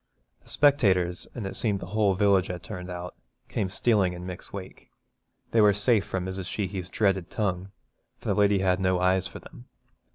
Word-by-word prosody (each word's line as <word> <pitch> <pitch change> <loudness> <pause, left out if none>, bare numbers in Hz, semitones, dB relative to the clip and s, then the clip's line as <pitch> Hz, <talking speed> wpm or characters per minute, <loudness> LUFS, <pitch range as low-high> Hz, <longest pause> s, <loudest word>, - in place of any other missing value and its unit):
The - - -19
spectators, 95 -12 +2
and 115 -5 -4
it 95 - -5
seemed 105 -4 0
the - - -7
whole 105 -3 +3
village 100 -2 +3
had 90 -1 -6
turned 90 0 -7
out, 90 0 -6 0.4
came 95 - -1
stealing 100 -3 +2
in 90 0 -8
Mick's 90 -1 -7
wake. 95 -2 -9 0.6
They 115 - +4
were 105 -1 +6
safe 105 +1 +2
from 95 -2 -3
Mrs. 95 -1 -4
Sheehy's 95 -3 -3
dreaded 95 -4 +1
tongue, 95 -3 -2 0.5
for - - -11
the - - +3
lady 100 -1 +3
had 95 -1 +2
no 95 -1 +1
eyes 90 0 +2
for - - -9
them. - - -13
95 Hz, 190 wpm, -27 LUFS, 90-105 Hz, 0.6 s, were